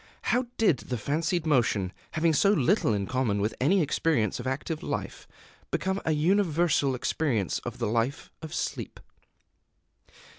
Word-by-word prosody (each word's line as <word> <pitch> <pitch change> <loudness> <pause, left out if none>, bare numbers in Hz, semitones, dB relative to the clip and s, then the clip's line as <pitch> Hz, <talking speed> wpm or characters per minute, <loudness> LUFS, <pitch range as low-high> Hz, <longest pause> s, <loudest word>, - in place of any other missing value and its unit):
How 250 +1 +1
did 200 -11 +4
the 125 - -4
fancied 160 - -1
motion, 115 - +1 0.2
having 160 0 +2
so 195 +7 +4
little 135 - +2
in 100 -2 0
common 125 -4 0
with 105 +2 0
any 175 +7 +4
experience 140 - 0
of - - -5
active 150 +4 -3
life, - - -5 0.4
become 190 +2 -1
a 160 - +2
universal 160 -4 +2
experience 120 - -1
of - - -7
the - - -2
life 115 +5 -1
of 160 -1 -7
sleep? - - -4
150 Hz, 145 wpm, -27 LUFS, 120-170 Hz, 0.4 s, did